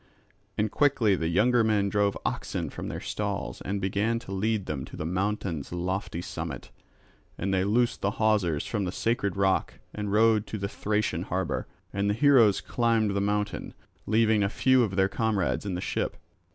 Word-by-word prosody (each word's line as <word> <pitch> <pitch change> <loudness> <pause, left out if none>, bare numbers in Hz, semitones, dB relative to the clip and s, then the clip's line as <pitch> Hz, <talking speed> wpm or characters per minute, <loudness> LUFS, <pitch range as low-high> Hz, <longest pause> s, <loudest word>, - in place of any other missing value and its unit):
And 105 -1 0
quickly 125 -9 +3
the 80 -2 -1
younger 115 +8 +3
men 105 -2 +2
drove 100 0 +1
oxen - - -2
from - - -6
their - - -4
stalls - - -3
and 100 +1 -2
began 100 +4 0
to 100 - -10
lead 105 +1 0
them 70 -4 -3
to - - -11
the - - -4
mountain's 90 -4 -2
lofty 90 0 -3
summit. - - -6 0.7
And 95 0 -1
they 95 -1 +2
loosed 120 +4 +1
the 100 +1 0
hawsers 105 -9 +2
from 105 -4 -2
the 90 - -2
sacred 100 -3 -1
rock 95 -1 +1 0.2
and 105 -1 -3
rowed 110 0 +4
to 110 - -4
the 100 -1 -2
Thracian 105 +1 -1
harbour; - - -2 0.3
and 100 +1 0
the 105 - +1
heroes 120 -6 +5
climbed 115 -3 +1
the 100 0 0
mountain, 105 0 -2 0.3
leaving 110 0 +3
a 100 - +2
few 130 +3 +3
of 105 -5 0
their 95 0 +3
comrades 105 -2 -1
in 95 - -2
the 90 - -3
ship. - - -2
100 Hz, 180 wpm, -27 LUFS, 95-110 Hz, 0.7 s, heroes